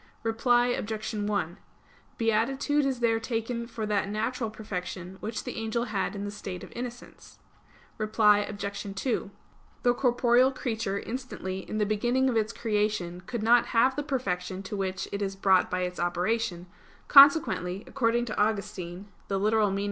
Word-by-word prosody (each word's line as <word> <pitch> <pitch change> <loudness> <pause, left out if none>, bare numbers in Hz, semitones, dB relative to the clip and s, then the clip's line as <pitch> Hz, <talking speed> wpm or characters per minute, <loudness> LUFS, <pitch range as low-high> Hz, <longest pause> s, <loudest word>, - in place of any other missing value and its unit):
Reply 240 +2 +3
Obj. 220 -2 -3
1: 205 -4 -2 0.6
Beatitude 270 +6 +1
is 260 -3 -2
there 225 -1 +3
taken 230 +1 -3
for 230 -2 -4
that 205 -2 0
natural 225 +3 -2
perfection 190 -3 -6
which 220 +1 -4
the - - -6
angel 225 +1 -1
had 215 -3 -2
in 200 0 -4
the 205 - -4
state 195 -3 -7
of - - -11
innocence. 245 0 -8 0.6
Reply 215 -1 +4
Obj. 200 -1 -5
2: 225 -1 -1 0.5
The 245 - +4
corporeal 245 0 +3
creature 220 -6 -2
instantly 210 -7 -5
in 215 - -3
the 210 - +2
beginning 240 +5 +1
of 245 - -1
its 220 0 +1
creation 210 -6 -1
could 235 -3 -3
not 235 +2 +5
have 260 +3 +4
the 290 - -1
perfection 195 -9 -3
to 205 +2 -5
which 190 -1 -2
it 200 - -3
is 195 -1 -2
brought 190 -1 +3
by 185 - -1
its 180 0 -3
operation; 175 +1 -1 0.4
consequently, 255 - +6
according 240 -2 +1
to 220 - -4
Augustine 200 -3 -2 0.2
(Gen. 195 0 0
ad. 205 -3 +2
215 Hz, 155 wpm, -28 LUFS, 195-240 Hz, 0.6 s, consequently